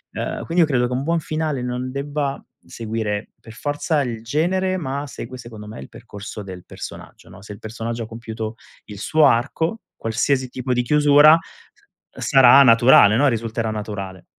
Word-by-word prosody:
Uhm, - - -4
quindi 170 +2 +1
io 155 - +1
credo 125 -4 +1
che 125 - -4
un 130 +2 -2
buon 165 +2 0
finale 155 -3 -2
non 125 +1 -4
debba 140 0 -3 0.2
seguire 110 -2 -4
per 115 - -13
forza 145 +3 -1
il 115 -3 -5
genere, 185 +8 0
ma 140 -3 -4
segue, 130 -1 -8
secondo 110 -4 -10
me, 105 - -9
il 65 - -11
percorso 105 +1 -9
del 95 -2 -10
personaggio, - - -10
no, 90 +2 -14
se 105 - -11
il 100 - -13
personaggio 115 +1 -5
ha 110 - -8
compiuto 110 -1 -6 0.3
il 105 -2 -10
suo 155 +7 +3
arco, 145 - 0 0.2
qualsiasi 130 +4 0
tipo 125 +1 -4
di 125 - +1
chiusura 150 +3 +6 0.7
s - - -12
sarà 135 +1 +7
naturale, 115 -3 +6
no, 145 - +4
risulterà 115 -1 -2
naturale. 100 -4 -6
125 Hz, 175 wpm, -21 LUFS, 110-145 Hz, 0.7 s, sarà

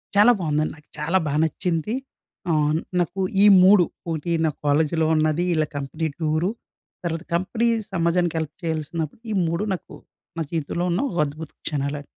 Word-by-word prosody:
చాలా 210 +4 +7
బాగుందండి. 155 -1 0
నాకు 150 - -21
చాలా 165 +5 +2
బాగా 150 +1 0
నచ్చింది. 165 +5 -1 0.6
ఆహ్, 150 -1 +2 0.2
నాకు 175 +2 -1 0.2
ఈ - - +8 0.2
3 190 -1 +7 0.3
ఒకటి 160 +1 -2
నా 155 - +2
కాలేజీలో 155 +2 +2
ఉన్నది, 155 +2 +2
వీళ్ళ 155 -2 +2
కంపెనీ 150 +3 -3
టూరు, 155 +3 +1 0.6
తర్వాత 165 0 -2
కంపెనీ 220 +7 0 0.3
సమాజానికి 170 -1 +1
హెల్ప్ 160 -2 -5
చేయాల్సినప్పుడు 160 +3 -3
ఈ - - 0
మూడు 170 +5 -1
నాకు 180 - -7 0.4
నా - - -1
జీవితంలో 165 +2 -1
ఉన్న 175 - +1
ఒక 175 - -5
అద్భుత 150 +2 -7 0.2
క్షణాలండి. 145 -1 -2
160 Hz, 150 wpm, -23 LUFS, 155-175 Hz, 0.6 s, ఈ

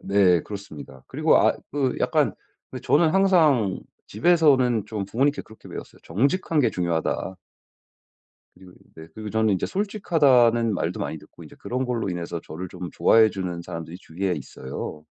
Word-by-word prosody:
네 95 -3 +3
그렇습니다. 80 -10 -10
그리고 - - +2
아 - - +4 0.2
그 135 -3 -1
약간 - - +1 0.4
그 - - -7
저는 160 +2 +3
항상 155 - +3 0.3
집에서는 130 - +3
좀 105 -2 -4
부모님께 135 +8 0
그렇게 110 - -16
배웠어요. - - -10
정직한 145 - 0
게 130 - +2
중요하다. 85 +1 -2 1.2
그리고 90 -1 -16 0.2
네 80 0 -11
그리고 110 -1 -7
저는 110 -1 +2
이제 90 - -2
솔직하다는 140 - +2
말도 - - -2
많이 - - -4
듣고 - - -15
이제 - - -14
그런 130 +2 -3
걸로 120 -5 -2
인해서 85 -1 -4
저를 90 +4 -7
좀 90 0 -7
좋아해주는 95 -6 +2
사람들이 85 0 -7
주위에 95 +2 -3
있어요. 75 0 -7
110 Hz, 360 characters per minute, -24 LUFS, 90-135 Hz, 1.2 s, 아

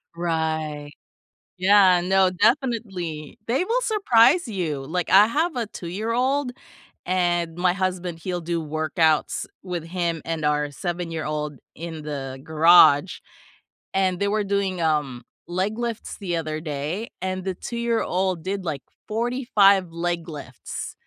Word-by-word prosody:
Right. 160 -3 -2 0.7
Yeah, 185 -1 +6
no, 190 +1 +3
definitely. 190 - -1
They 260 +10 +1
will 480 +5 +1
surprise 345 - +4
you. 165 -10 -3
Like, 175 +3 -2
I 200 +2 +8
have 315 +9 0
a 240 -3 -2
two-year-old, 230 +9 -1 0.5
and 175 -2 0
my 180 0 +2
husband, 180 -2 -2
he'll 180 0 -3
do 170 0 -2
workouts 155 0 0 0.2
with 180 -3 -4
him 170 -1 -2
and 165 -2 -3
our 150 0 +1
seven-year-old 155 -3 -4 0.2
in 160 0 -7
the 135 -3 -5
garage, 160 +1 +5 0.8
and 185 -2 +1
they 200 - +1
were 210 0 +1
doing, 195 -2 -1
um, 150 -6 0 0.2
leg 190 +5 -2
lifts 235 -2 -4
the 180 -4 -2
other 155 -1 -3
day, 155 +8 -4
and 185 0 -3
the 190 0 -2
two-year-old 190 -7 -1
did, 195 0 -3
like, 145 -5 -3 0.3
45 215 -5 +3
leg 170 0 -2
lifts 140 -6 -7
180 Hz, 130 wpm, -24 LUFS, 160-200 Hz, 0.8 s, I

